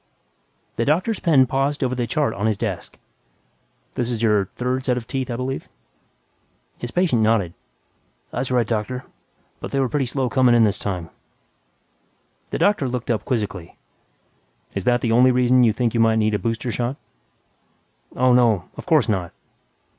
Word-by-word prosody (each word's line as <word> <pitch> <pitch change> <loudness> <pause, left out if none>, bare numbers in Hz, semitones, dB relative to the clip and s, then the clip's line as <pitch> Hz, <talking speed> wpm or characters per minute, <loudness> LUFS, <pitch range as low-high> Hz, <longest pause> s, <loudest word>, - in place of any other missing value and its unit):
by - - -44
Robert - - -44
J. - - -44
Martin - - -43
The 115 - +1
doctor's 185 +9 +1
pen 145 -6 +4
paused 135 +3 -1
over 130 -1 0
the 120 -2 -2
chart 145 -5 0
on 105 +1 -1
his 110 -2 0
desk, - - -4 1.0
"This 120 - -2
is 115 -2 -2
your 105 -3 +3
third 125 +1 -1
set 125 -2 0
of 120 - -5
teeth, 130 +1 -3
I 120 - -2
believe?" 130 +2 -4 1.1
His 120 - -5
patient 160 -6 +1
nodded, 110 -6 +2 0.8
"That's 125 +1 -3
right, 125 -2 +2
Doctor. 115 +4 -3 0.5
But - - -6
they 140 - -1
were 135 - +2
pretty 135 0 -1
slow 130 +1 -1
coming 125 -1 +3
in 115 - +5
this 105 -2 +1
time." 90 -5 -4 1.4
The - - -3
doctor 200 -10 +2
looked 125 -1 -3
up 110 - -1
quizzically, 105 -9 -3 1.0
"Is 100 - -4
that 120 0 +3
the 115 - 0
only 125 +3 +5
reason 125 0 +4
you 115 - +5
think 115 +1 -1
you 115 - 0
might 115 0 +4
need 110 -1 +1
a 105 - +1
booster 115 +1 -2
shot?" 120 +4 -2 1.2
"Oh, 125 0 +3
no... 115 -7 +3
of - - -9
course 155 -8 +4
not!" 95 -6 -1
120 Hz, 185 wpm, -22 LUFS, 110-130 Hz, 1.4 s, in